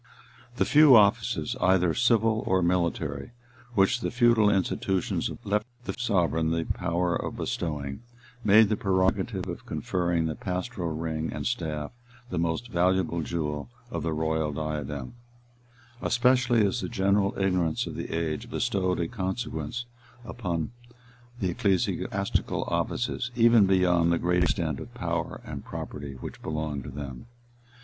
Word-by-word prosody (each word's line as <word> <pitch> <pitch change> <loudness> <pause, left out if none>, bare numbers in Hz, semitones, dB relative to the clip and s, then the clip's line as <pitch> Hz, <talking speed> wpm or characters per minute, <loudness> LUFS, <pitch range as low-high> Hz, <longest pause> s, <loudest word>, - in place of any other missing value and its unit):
30] - - -18
The - - +3
few 150 -3 +7
offices, 105 -5 +3
either 90 -2 +3
civil 115 -1 +3
or 95 -1 +3
military, 85 - -1 0.4
which 95 +5 +3
the - - -2
feudal 120 -3 +4
institutions 95 -1 0
left 105 +3 0 0.2
the - - -3
sovereign 90 -9 +1
the 80 0 0
power 90 0 0
of - - -4
bestowing, 75 -3 -3 0.4
made 105 0 +6
the 110 - +2
prerogative 95 -2 0
of - - -7
conferring 85 -2 0
the 80 - -1
pastoral 90 +2 -3
ring 80 0 -3
and 75 - -5
staff 80 -11 -2 0.4
the 90 - -1
most 85 +9 -1
valuable 90 -3 +1
jewel 75 -4 -3 0.2
of - - -3
the 80 - -1
royal 80 0 0
diadem: 75 - -4 0.9
especially 120 -3 +3
as 100 +4 0
the - - -3
general 100 -2 +1
ignorance 90 -4 +1
of - - -6
the - - -5
age 80 -2 -2
bestowed 95 -2 0
a 85 - 0
consequence 95 +2 -3 0.6
on 85 -4 -1 0.7
the 95 -4 0
ecclesiastical 95 +1 0
offices, 125 +1 -1
even 115 -3 +6
beyond 90 -3 +3
the 85 - +3
great 90 +1 +1
extent 80 -4 0
of - - -9
power - - -3
and - - -6
property 70 -2 -6
which - - -8
belonged 75 -3 -3
to - - -6
them. 65 - -7
90 Hz, 140 wpm, -27 LUFS, 80-105 Hz, 0.9 s, few